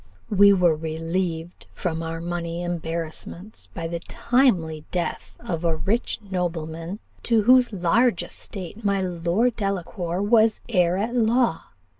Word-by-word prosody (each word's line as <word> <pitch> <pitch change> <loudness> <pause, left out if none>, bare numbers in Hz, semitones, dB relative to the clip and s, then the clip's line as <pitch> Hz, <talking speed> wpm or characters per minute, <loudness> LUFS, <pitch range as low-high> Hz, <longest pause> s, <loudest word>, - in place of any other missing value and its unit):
"We 200 0 +7
were 180 -4 +4
relieved 165 +2 -3
from 165 -2 -2
our 165 0 -4
money 170 0 -3
embarrassments 170 +3 -5
by 165 -3 -3
the 170 0 -3
timely 175 - +1
death 175 -2 -3
of 175 -8 -4
a 165 -1 +2
rich 195 +10 -1
nobleman, 165 0 -3 0.2
to 230 -3 +2
whose 250 +2 +5
large 195 +3 +2
estate 195 +3 -6
my 200 -1 +2
Lord 180 +7 +1
Delacour 180 -3 -2
was 220 0 +4
heir 180 -6 +2
at 220 +5 -1
law. 235 -5 +2
180 Hz, 130 wpm, -24 LUFS, 165-215 Hz, 0.2 s, We